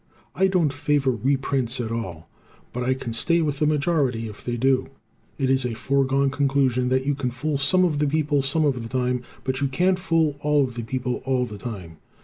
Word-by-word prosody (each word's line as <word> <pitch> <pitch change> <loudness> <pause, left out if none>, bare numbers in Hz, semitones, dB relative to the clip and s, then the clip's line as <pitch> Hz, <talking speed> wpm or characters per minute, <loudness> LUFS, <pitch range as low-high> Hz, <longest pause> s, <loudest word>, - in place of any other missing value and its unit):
I 190 - +3
don't 175 -7 +1
favor 140 0 +1
reprints 130 0 -1
at 115 -2 -3
all, 95 -8 -5 0.5
but 125 - -3
I 130 +1 +1
can 120 -3 -5
stay 170 +9 +2
with 145 -2 -2
the 150 - +2
majority 140 -6 +1
if 105 - -10
they 120 -1 -2
do. 130 +2 +2 0.5
It 135 - 0
is 135 0 +2
a 120 -2 -2
foregone 135 +2 +1
conclusion 135 -3 +1
that 130 +1 +1
you 145 - +1
can 135 -2 -2
fool 140 +4 -2
some 185 +6 +4
of 155 -4 0
the 150 - +2
people 150 -1 +1
some 145 +4 +1
of 130 -4 0
the 115 - -7
time, 125 0 0 0.2
but 130 +1 -2
you 140 - +2
can't 180 +7 +1
fool 165 -5 +1
all 150 -1 +2
of 130 -2 -3
the 120 - -4
people 125 +2 -3
all 130 -2 +1
the 105 -4 -9
time. 95 -7 -7
135 Hz, 215 wpm, -24 LUFS, 125-145 Hz, 0.5 s, some